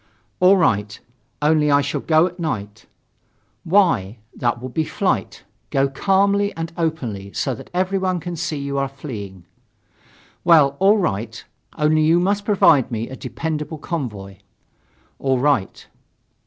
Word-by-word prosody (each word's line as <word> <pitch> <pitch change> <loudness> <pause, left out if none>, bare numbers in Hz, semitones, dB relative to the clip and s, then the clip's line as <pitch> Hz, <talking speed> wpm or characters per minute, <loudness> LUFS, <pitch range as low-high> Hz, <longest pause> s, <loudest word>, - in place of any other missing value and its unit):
"All 185 +2 +6
right. 105 - 0 0.4
Only 150 0 +3
I 140 0 +4
shall 140 0 -3
go 160 +1 +3
at 180 0 -6
night." 110 -10 -4 0.8
"Why? 160 - +2 0.2
That 120 -1 -1
would 130 0 -8
be 160 - +1
flight. - - -2 0.3
Go 135 0 +2
calmly 200 +6 +2
and 165 0 -5
openly, 125 - -3
so 135 - -1
that 115 - -11
everyone 185 0 0
can 175 +1 -6
see 160 -1 -3
that - - -5
you 140 0 -3
are 135 - 0
fleeing." 105 - -8 1.0
"Well, 155 -5 +5
all 200 +3 +5
right. 115 - -3 0.3
Only 155 0 +2
you 160 +3 +4
must 200 +3 0
provide 165 - +4
for - - -9
me 115 +1 -3
a 130 - -7
dependable 155 +1 -4
convoy." 105 - -5 0.8
"All 135 -1 +1
right." 130 -6 0
150 Hz, 145 wpm, -21 LUFS, 120-175 Hz, 1.0 s, All